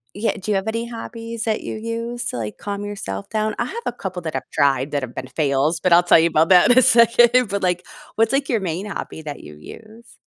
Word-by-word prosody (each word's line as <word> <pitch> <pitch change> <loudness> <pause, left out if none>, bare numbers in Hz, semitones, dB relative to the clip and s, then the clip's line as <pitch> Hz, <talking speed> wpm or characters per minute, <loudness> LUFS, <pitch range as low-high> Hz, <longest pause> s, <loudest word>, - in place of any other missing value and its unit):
yeah, 220 +2 0
do 210 - -4
you 205 - +2
have 195 +3 -4
any 230 +1 -2
hobbies 230 -1 -7
that 220 -1 -1
you - - -5
use 230 +2 -5
to, 180 - -4
like, 105 -2 -5
calm 205 0 -5
yourself 100 - -6
down? 215 0 -1
I 240 - -1
have 465 - -6
a - - 0
couple 185 -6 -6
that 160 -2 -5
I've - - -4
tried 140 0 +1
that 145 - -1
have 125 -2 -7
been - - -5
fails, 145 +3 0
but 180 - 0
I'll 175 +1 +7
tell 175 - +6
you 165 - +4
about 160 0 +2
that 185 +3 +6
in 245 - +5
a 255 - +7
second, 240 0 +5
but, 200 0 -3
like, 180 -1 0 0.3
what's, 225 0 +1
like, 275 0 0
your 230 -4 +1
main 180 +1 -4
hobby 195 -5 -7
that 145 -2 -7
you 75 - -12
use? 220 - -14
205 Hz, 255 wpm, -21 LUFS, 160-230 Hz, 0.3 s, I'll